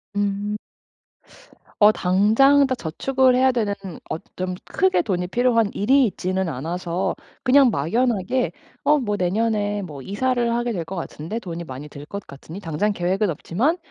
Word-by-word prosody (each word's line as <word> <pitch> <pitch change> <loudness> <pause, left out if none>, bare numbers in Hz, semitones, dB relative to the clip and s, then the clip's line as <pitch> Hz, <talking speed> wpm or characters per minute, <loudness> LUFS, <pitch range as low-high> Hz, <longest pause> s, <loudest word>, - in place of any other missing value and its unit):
음. 205 +1 -1 1.2
어 210 0 +8
당장 220 +10 +4
다 260 - 0
저축을 255 +8 +1
해야 260 +1 +4
되는 215 -5 0 0.3
어 - - -2 0.2
좀 185 0 -2
크게 185 -1 +2
돈이 180 -1 -2
필요한 230 +1 +2
일이 265 +6 +4
있지는 185 -2 -1
않아서 170 +5 -2 0.3
그냥 270 0 +6
막연하게 230 - 0 0.3
'어 300 - +5
뭐 210 -7 -1
내년에 205 +2 0
뭐 150 -7 -8
이사를 235 - 0
하게 240 0 -1
될 175 -7 -3
것 190 - -6
같은데 170 +3 -5
돈이 170 -5 -6
많이 135 +1 -8
들 145 0 -10
것 200 +5 -7
같으니 155 +7 -10
당장 175 +5 -1
계획은 190 +2 0
없지만 225 - 0
205 Hz, 295 characters per minute, -22 LUFS, 175-240 Hz, 1.2 s, 어